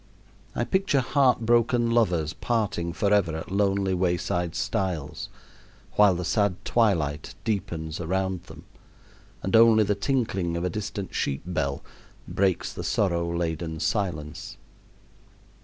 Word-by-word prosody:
I - - 0
picture 190 -8 +1
heartbroken 120 -3 +3
lovers 90 -10 +2
parting 105 -7 -1
forever 100 -2 +2
at 80 - -8
lonely 100 -1 +1
wayside 90 -1 0
stiles, 80 -6 -2 0.6
while 105 -3 +5
the 90 0 -3
sad 100 -4 +1
twilight 80 -11 +1
deepens 85 -7 -3
around 95 +1 -2
them, - - -13 0.8
and 95 - 0
only 115 -1 +7
the 105 0 +1
tinkling 100 -6 -1
of 85 - -3
a 90 - -1
distant 100 -1 -5
sheep 70 -1 -1
bell 80 -6 -2 0.4
breaks 95 -2 0
the - - -6
sorrow 85 -4 0
laden 80 -1 -2
silence. 85 -7 -3
95 Hz, 120 wpm, -26 LUFS, 85-105 Hz, 0.8 s, only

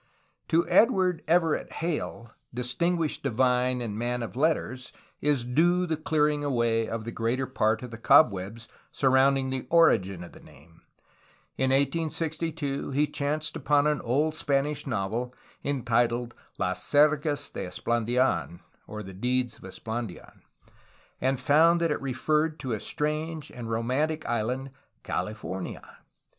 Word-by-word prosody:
To 165 +1 +2
Edward 185 -6 +3
Everett 165 -1 +1
Hale, 115 - -4 0.2
distinguished 155 +7 -1
divine 125 0 +1
and 110 -4 -3
man 120 0 -1
of 115 - -7
letters, 130 -3 -1 0.3
is 145 -4 +1
due 175 +9 +2
the 160 -2 -1
clearing 150 -1 +1
away 115 -5 +1
of 115 -1 -4
the 115 - -5
greater 115 +4 -1
part 110 -3 0
of 125 - -7
the 115 - -8
cobwebs 115 -5 +3 0.2
surrounding 135 0 +3
the 130 -1 -4
origin 100 - +3
of 85 - -11
the - - -14
name. 80 +4 -18 0.7
In 130 0 +1
1862 155 +1 -1
he 140 +2 +2
chanced 150 +1 -2
upon 145 -1 +2
an 150 -1 +1
old 145 +6 +1
Spanish 145 -1 -1
novel 115 +3 -2 0.3
entitled 120 -3 0 0.2
Las - - -1
sergas 145 0 +2
de - - -5
Esplandidn 120 -1 0 0.3
(The 105 -3 -7
deeds 125 +4 -1
of - - -19
Esplandian), 110 +1 -7 0.8
and 130 0 +1
found 165 +4 +4
that 170 -2 +1
it - - -2
referred 150 +4 0
to 130 -3 -3
a 110 - -2
strange 150 +3 -2
and 115 -2 -7
romantic 130 +8 -1
island 125 +4 -2 0.3
"California." 95 -4 -5
130 Hz, 130 wpm, -27 LUFS, 115-150 Hz, 0.8 s, found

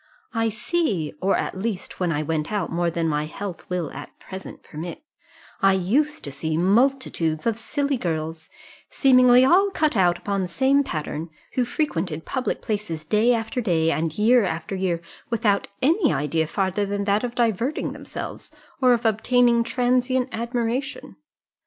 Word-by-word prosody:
"I 225 -1 +1
see 210 - -1
or 195 +1 +2
at 190 - -3
least 205 -2 -4
when 180 -2 +1
I 150 -1 -1
went 155 +1 -2
out 205 -5 -1
more 170 +1 +1
than 165 0 -1
my 150 -1 0
health 190 +2 -7
will 180 -4 -2
at - - -10
present 190 0 -9
permit 165 - -7 0.6
I 195 0 +5
used 270 - +1
to 140 - -5
see 155 +3 -2
multitudes 195 - +1
of 230 -2 +2
silly 280 +4 -1
girls, 160 -4 -4 0.4
seemingly 255 -2 +6
all 380 +8 +5
cut 310 -7 0
out 175 -3 +3
upon 200 +1 -2
the 185 - -2
same 270 +10 +2
pattern, 155 - -4 0.2
who 250 - +1
frequented 175 - -2
public 260 -1 -2
places 200 -8 -3
day 215 +8 +3
after 225 +3 -2
day, 165 -6 +2
and 160 -1 -2
year 235 +3 +5
after 165 0 -3
year, 180 -3 -1 0.3
without 210 -3 +1 0.2
any 320 - +3
idea 155 +3 0
farther 190 +4 0
than 200 0 -2
that 200 +2 +1
of 245 -1 -3
diverting 235 +4 0
themselves, - - -7 0.3
or 250 -1 +6
of 240 0 -1
obtaining 235 +2 +3
transient 250 +2 +1
admiration. 240 +3 -3
205 Hz, 160 wpm, -24 LUFS, 170-250 Hz, 0.6 s, seemingly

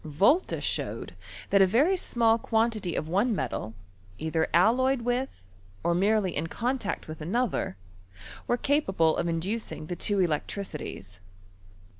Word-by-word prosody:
Volta 195 - +2
showed - - -3 0.4
that 200 - +5
a 190 - +6
very 280 - +3
small 230 -9 +2
quantity 220 -6 0
of 155 - -2
one 205 +7 +1
metal, 115 - -3 0.4
either 160 +3 0
alloyed 250 +7 +3
with, 245 - -2 0.4
or 170 - +2
merely 195 0 +2
in 160 +3 -1
con 250 +9 -1
tact 205 -3 -4
with 155 0 -8
another, 185 - -1 0.7
were 240 - +2
capable 190 - +2
of - - -1
inducing 175 +2 -3
the 175 - -4
two 200 +3 +1
electricities. 150 - -3
200 Hz, 135 wpm, -28 LUFS, 165-235 Hz, 0.7 s, a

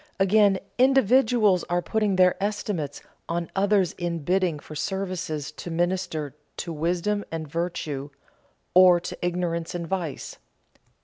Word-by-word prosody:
Again, 195 0 +4 0.2
individuals 245 -6 +4
are 175 0 -1
putting 210 +2 0
their 185 -1 +5
estimates 200 -8 -3 0.3
on 170 0 -2
others 195 -2 +2
in 170 -3 -2
bidding 180 -1 +1
for 150 - -11
services 180 -4 -3
to 165 - -8
minister 170 -4 -1 0.2
to 170 - -4
wisdom 175 +6 -1
and 160 -1 -4
virtue 150 -3 -3 0.6
or 180 -1 +7
to 175 - -6
ignorance 175 -1 -2
and 170 -1 -3
vice. 170 -5 -4
180 Hz, 125 wpm, -25 LUFS, 165-195 Hz, 0.6 s, or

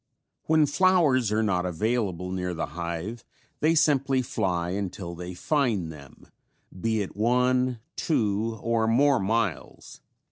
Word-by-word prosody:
When 155 -1 +4
flowers 145 - +3
are 110 +1 +1
not 90 -4 +1
available 90 -1 -1
near 90 -1 -3
the 80 - -2
hive 85 +7 -5 0.4
they 160 +2 +3
simply 140 -4 +2
fly 95 -9 -1
until 95 -2 -4
they 90 +1 -7
find 115 - 0
them, 70 -3 -14 0.6
be 110 -2 +1
it 95 - -9
one, 125 +2 +1
two 110 -5 0
or 115 -1 +1
more 135 +4 +4
miles. 100 -2 -3
110 Hz, 130 wpm, -26 LUFS, 90-130 Hz, 0.6 s, When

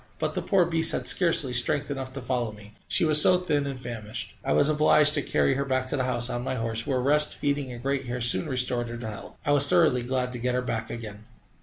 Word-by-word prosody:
But - - -3
the - - -3
poor 190 -4 +2
beast 165 -1 +3
had - - -3
scarcely 165 -7 +3
strength 140 +4 +1
enough 135 -2 -5
to 135 -2 -7
follow 125 -3 -2
me, 105 0 -15
she - - +1
was 150 -1 +5
so 180 +3 +5
thin 150 -6 -2
and 135 -2 -6
famished. 115 -4 -7
I - - -2
was 145 - +3
obliged 150 0 +3
to 145 - 0
carry 135 - 0
her 140 +1 -2
back 130 -1 -2
to - - -1
the 130 - -1
house 120 -1 +1
on 120 -1 -4
my 130 - -3
horse, 115 -1 -3
where 130 -2 0
rest, 150 +4 +2
feeding, 145 -2 -3
and 120 0 -10
great 135 -1 -2
care 120 +1 -4
soon 120 +6 +2
restored 125 -2 -1
her 120 - -7
to 115 -1 -7
health. 110 0 -10
I - - +1
was 145 -1 +7
thoroughly 165 -8 +3
glad 125 0 -3
to 120 - -3
get 125 +1 -2
her 125 - -1
back 115 -2 -4
again. 110 -2 -9
130 Hz, 260 wpm, -25 LUFS, 120-145 Hz, -, was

